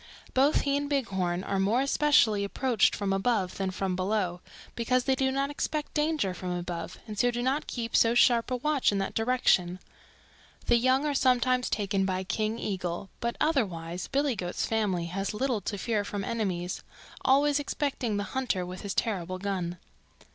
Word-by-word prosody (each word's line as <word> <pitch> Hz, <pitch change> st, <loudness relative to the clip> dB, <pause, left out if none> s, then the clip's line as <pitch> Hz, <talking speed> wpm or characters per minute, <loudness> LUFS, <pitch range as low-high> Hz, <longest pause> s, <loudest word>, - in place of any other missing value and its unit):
Both 275 Hz, +4 st, +4 dB
he 280 Hz, -1 st, 0 dB
and 285 Hz, 0 st, -3 dB
Bighorn 190 Hz, -10 st, -1 dB
are 195 Hz, -1 st, -1 dB
more 220 Hz, +7 st, +2 dB
easily 265 Hz, -8 st, +3 dB
approached 230 Hz, +1 st, +2 dB
from 200 Hz, -1 st, -1 dB
above 195 Hz, -2 st, 0 dB
than 195 Hz, -1 st, -1 dB
from 185 Hz, 0 st, -2 dB
below, 185 Hz, -2 st, -1 dB, 0.3 s
because 245 Hz, +2 st, +1 dB
they 265 Hz, -, +2 dB
do 265 Hz, 0 st, +1 dB
not 275 Hz, +1 st, -1 dB
expect 300 Hz, +1 st, -3 dB
danger 300 Hz, -10 st, 0 dB
from 180 Hz, 0 st, -6 dB
above 175 Hz, -1 st, -4 dB
and 210 Hz, -2 st, -6 dB
so 245 Hz, -, +4 dB
do 240 Hz, 0 st, -2 dB
not 270 Hz, +4 st, 0 dB
keep 230 Hz, -2 st, -3 dB
so 230 Hz, +1 st, +4 dB
sharp 240 Hz, -1 st, +4 dB
a 255 Hz, -, 0 dB
watch 285 Hz, 0 st, +1 dB
in 200 Hz, -, -1 dB
that 195 Hz, 0 st, -2 dB
direction. 225 Hz, -7 st, +2 dB, 0.9 s
The 240 Hz, -, +4 dB
young 260 Hz, +4 st, +2 dB
are 295 Hz, -, 0 dB
sometimes 255 Hz, -1 st, +2 dB
taken 200 Hz, -2 st, 0 dB
by 190 Hz, 0 st, -1 dB
King 215 Hz, +3 st, -1 dB
Eagle, 185 Hz, -3 st, -4 dB
but 235 Hz, 0 st, -2 dB
otherwise 180 Hz, -, -1 dB
Billy 280 Hz, -2 st, +1 dB
Goat's 180 Hz, -3 st, -2 dB
family 205 Hz, -6 st, 0 dB
has 195 Hz, +4 st, -3 dB
little 245 Hz, -2 st, 0 dB
to 205 Hz, -, -4 dB
fear 210 Hz, +1 st, 0 dB
from 205 Hz, 0 st, -4 dB
enemies, 185 Hz, -5 st, -2 dB, 0.4 s
always 285 Hz, +2 st, +4 dB
excepting 275 Hz, -6 st, -2 dB
the 205 Hz, -, -1 dB
hunter 250 Hz, -9 st, -1 dB
with 180 Hz, +1 st, -7 dB
his 200 Hz, -2 st, -4 dB
terrible 185 Hz, -4 st, -1 dB
gun. 185 Hz, -3 st, -3 dB
220 Hz, 175 wpm, -28 LUFS, 190-260 Hz, 0.9 s, Both